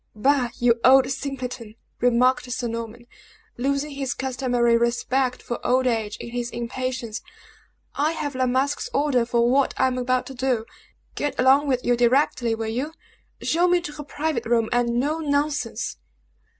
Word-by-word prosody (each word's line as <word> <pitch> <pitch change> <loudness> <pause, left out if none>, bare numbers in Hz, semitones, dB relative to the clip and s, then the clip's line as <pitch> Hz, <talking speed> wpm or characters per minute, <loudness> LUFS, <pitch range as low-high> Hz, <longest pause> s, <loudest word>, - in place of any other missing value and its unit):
"Bah! 260 +2 +2
you 240 -1 +3
old 265 +1 +6
simpleton!" 255 -5 -5 0.2
remarked 245 +1 +2
Sir 240 0 -2
Norman, 230 +1 -6 0.5
losing 280 +4 -1
his 275 -2 -3
customary 245 -3 +1
respect 250 +2 0
for 240 - -5
old 255 +1 +2
age 225 -4 -1
in - - -8
his 240 0 -3
impatience, 240 -1 -4 0.7
"I 305 +3 +1
have 290 -3 -3
La 255 0 0
Masque's 280 - 0
order 260 -5 +2
for 235 0 +2
what 270 +2 +2
I - - +3
am 255 -1 0
about 255 0 0
to 270 - -8
do. 250 -3 -1 0.5
Get 290 - -3
along 270 +3 +5
with 255 -2 0
you 245 - +3
directly, 240 -1 +2
will 225 0 -4
you? 255 +8 -3 0.5
Show 345 +3 +2
me 355 0 +4
to 340 - -6
her 295 0 -8
private 290 -4 -3
room, 230 -1 +2
and 240 0 +1
no 300 +5 0
nonsense!" 285 - -1
255 Hz, 165 wpm, -24 LUFS, 235-280 Hz, 0.7 s, old